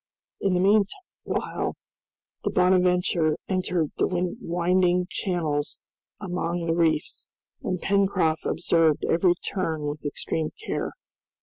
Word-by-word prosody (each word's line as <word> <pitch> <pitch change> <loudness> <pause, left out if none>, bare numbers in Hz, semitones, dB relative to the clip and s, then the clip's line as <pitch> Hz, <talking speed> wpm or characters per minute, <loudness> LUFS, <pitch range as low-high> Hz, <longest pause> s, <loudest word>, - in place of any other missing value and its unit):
In 195 -2 +1
the - - +2
meanwhile 205 - 0 0.7
the - - +1
"Bonadventure" 180 -3 +3
entered 180 -4 0
the 180 -1 0
winding 180 +1 +2
channels 155 -6 -1 0.4
among 175 -3 -2
the 165 - +1
reefs, 160 -2 0 0.3
and 185 -1 -2
Pencroft 190 -5 +1
observed 165 -2 +2
every 175 +1 +3
turn 160 -6 -2
with 145 +1 -5
extreme 155 +1 -2 0.2
care. - - -2
175 Hz, 105 wpm, -26 LUFS, 160-185 Hz, 0.7 s, Bonadventure